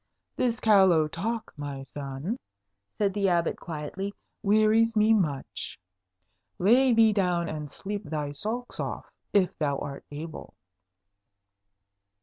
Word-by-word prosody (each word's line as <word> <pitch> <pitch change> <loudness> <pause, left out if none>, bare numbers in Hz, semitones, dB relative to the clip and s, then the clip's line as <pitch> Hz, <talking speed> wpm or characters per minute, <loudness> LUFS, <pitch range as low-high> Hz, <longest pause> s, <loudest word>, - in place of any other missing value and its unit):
"This 235 -2 0
callow 190 -7 +5
talk, 220 +8 -3
my 145 -2 -5
son," 140 - -5 0.6
said 200 -2 +1
the 200 -1 +2
Abbot 170 -1 +1
quietly, 175 +6 -5 0.3
"wearies 215 +2 +4
me 215 +1 +5
much. 155 -10 -2 0.8
Lay 245 +8 +5
thee 225 -2 +5
down 180 -4 +1
and 150 -2 -5
sleep 200 +6 -5
thy 150 -2 -3
sulks 220 +11 -4
off, - - -3 0.3
if 190 -3 +3
thou 145 -3 +1
art 140 -1 -6
able." 155 +2 -8
190 Hz, 120 wpm, -28 LUFS, 150-215 Hz, 0.8 s, callow